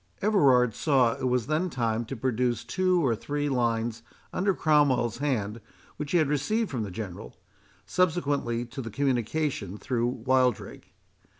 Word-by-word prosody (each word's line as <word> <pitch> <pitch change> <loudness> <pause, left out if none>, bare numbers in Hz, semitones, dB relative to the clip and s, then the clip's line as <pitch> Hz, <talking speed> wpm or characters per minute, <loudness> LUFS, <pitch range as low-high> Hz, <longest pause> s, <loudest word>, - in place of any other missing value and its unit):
Everard 135 - +4
saw 130 -3 +2
it 130 - -3
was 125 -2 +1
then 155 +5 0
time 115 -4 -1
to 135 - -6
produce 125 0 -1
two 185 -3 +1
or 120 -3 +2
three 145 +5 -2
lines 115 -3 0 0.3
under 195 +2 +1
Cromwell's 135 -7 +2
hand, 115 -6 -1 0.4
which 145 -1 -5
he 175 - +4
had 155 -4 +3
received 170 +11 0
from 125 -4 -2
the 105 - -3
General, 90 - -7 0.5
subsequently 145 -9 0
to 125 +3 -7
the 115 - -6
communication 125 - -1
through 120 +1 -1
Wildrake. 125 -1 -1
130 Hz, 145 wpm, -27 LUFS, 115-150 Hz, 0.5 s, Everard